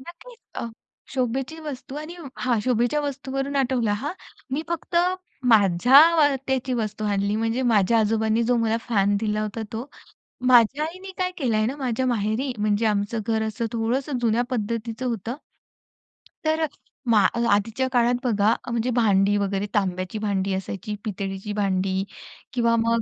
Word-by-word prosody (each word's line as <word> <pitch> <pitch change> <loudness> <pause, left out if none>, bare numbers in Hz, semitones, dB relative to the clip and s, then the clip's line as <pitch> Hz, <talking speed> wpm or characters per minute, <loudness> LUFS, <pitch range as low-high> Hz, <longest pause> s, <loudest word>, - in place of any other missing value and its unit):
नक्कीच! 350 - -13 0.2
अ, - - -4 0.5
शोभेची 265 +5 -1
वस्तू 275 -3 -7
आणि 310 +4 -7 0.2
हां, 245 -3 +1
शोभेच्या 245 +5 +1
वस्तूंवरून 275 0 -3
आठवलं 250 -5 +1
हां. 295 - -2 0.4
मी 285 +4 -1
फक्त 340 +1 -3 0.6
माझ्या 270 - +6
त्याची 260 -1 -1
वस्तू 215 -2 -3
आणली, 200 0 0
म्हणजे 225 +3 0
माझ्या 225 -1 +3
आजोबांनी 220 +1 +1
जो 245 +1 +2
मला 225 -1 +1
फॅन 200 -2 +2
दिला 215 -1 0
होता 215 +1 -4
तो. 235 +5 -5 0.6
माझ्या 255 +4 +5
आईनी 370 +4 -8
काय 365 0 0
केलंय 225 -7 +1
ना, 260 - -2
माझ्या 260 -2 -1
माहेरी, 235 +3 0
म्हणजे 210 +1 +1
आमचं 210 +1 0
घर 220 -1 +1
असं 220 +1 -2
थोडंसं 250 +4 -1
जुन्या 235 0 +2
पद्धतीच 230 0 -3
होतं. 235 0 -2 1.1
तर 315 +1 +1
अ, 235 -6 0
आधीच्या 225 +6 +1
काळात 245 -1 +3
बघा, 215 -2 +3 0.2
म्हणजे 235 +1 0
भांडी 205 -3 +3
वगैरे 200 0 -1
तांब्याची 185 0 -1
भांडी 200 -2 -1
असायची, 195 +2 -4
पितळीची 195 0 -4
भांडी, 190 -2 0 0.5
किंवा 235 -2 +2
मग 230 0 +2
230 Hz, 145 wpm, -24 LUFS, 210-260 Hz, 1.1 s, माझ्या